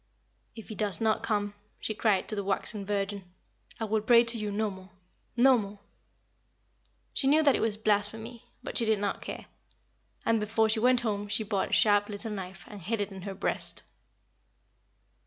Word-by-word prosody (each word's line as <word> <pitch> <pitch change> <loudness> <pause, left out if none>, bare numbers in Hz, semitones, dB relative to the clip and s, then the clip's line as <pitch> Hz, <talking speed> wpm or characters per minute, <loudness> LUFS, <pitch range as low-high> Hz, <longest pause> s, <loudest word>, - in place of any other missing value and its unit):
"If 225 - -10
he - - -5
does 210 -2 0
not 220 -1 +2
come," 205 -1 -1 0.3
she 215 - -3
cried 215 -3 +1
to 215 - -3
the 200 - -2
waxen 200 +1 -2
Virgin, 200 -1 -2 0.6
"I 225 - -1
will 215 0 +1
pray 235 +2 +6
to 230 0 -4
you 215 -2 -3
no 210 +1 -1
more 190 0 -12 0.5
no 255 0 +6
more." 205 0 -6 1.4
She 270 - 0
knew 305 +3 +5
that 280 -3 +5
it - - 0
was 220 -2 0
blasphemy, 220 +3 0 0.2
but - - -2
she 230 - +1
did 220 -1 +3
not 200 0 -2
care; - - -7 0.8
and 230 -1 +3
before 220 +1 +1
she 220 +1 +1
went 250 +1 +4
home 205 -3 -2
she 215 +2 -1
bought 200 -2 -1
a - - -5
sharp 205 -2 +4
little 210 +2 -5
knife 190 -2 -7
and 205 -2 -10
hid 220 +6 -2
it 205 0 -2
in 190 -1 -8
her 195 +1 -6
breast. - - -1
215 Hz, 190 wpm, -29 LUFS, 205-225 Hz, 1.4 s, pray